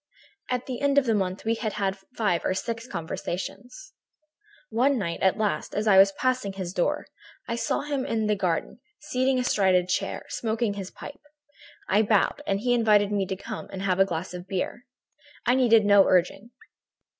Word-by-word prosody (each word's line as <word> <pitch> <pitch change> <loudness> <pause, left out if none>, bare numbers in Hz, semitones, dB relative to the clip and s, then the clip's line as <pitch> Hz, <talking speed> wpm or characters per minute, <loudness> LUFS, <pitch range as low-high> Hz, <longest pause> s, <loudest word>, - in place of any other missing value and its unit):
At 250 -1 -1
the 255 -1 -5
end 280 0 +2
of 275 -3 +4
a 225 - +3
month 190 -1 -2
we 225 - +2
had 220 -2 -3
had 195 -2 -1 0.2
five 200 -7 +1
or 185 - 0
six 230 +3 -4
conversations. 245 - -6 0.8
"One 255 +5 +2
night, 170 -6 -3
at 190 - +3
last, 215 -1 -2
as 210 - -1
I 195 -3 +6
was 195 +1 +7
passing 255 0 0
before 190 -1 -5
his 175 0 -6
door, 295 +12 0 0.4
I 230 - -2
saw 235 - -1
him 285 -2 -2
in 220 -3 -1
the 210 0 +2
garden, 180 -4 -2 0.2
seated 265 -3 0
astride 195 -7 +2
a 180 -1 +3
chair, 185 - -2
smoking 225 -1 -1
his 195 -2 -6
pipe. 290 - -11 0.7
I 205 +3 +3
bowed 210 -2 +2
and 195 0 0
he 245 +1 +2
invited 210 -3 +3
me 200 -2 0
to 190 - -3
come 215 +3 -7
in - - -17
and 190 - -5
have 185 -1 0
a 195 - +6
glass 180 0 -4
of 180 +1 -8
beer. 195 +7 -4 0.6
I 245 - +4
needed 230 -4 +4
no 205 -1 +6
urging. 185 +5 +1
210 Hz, 195 wpm, -26 LUFS, 190-245 Hz, 0.8 s, was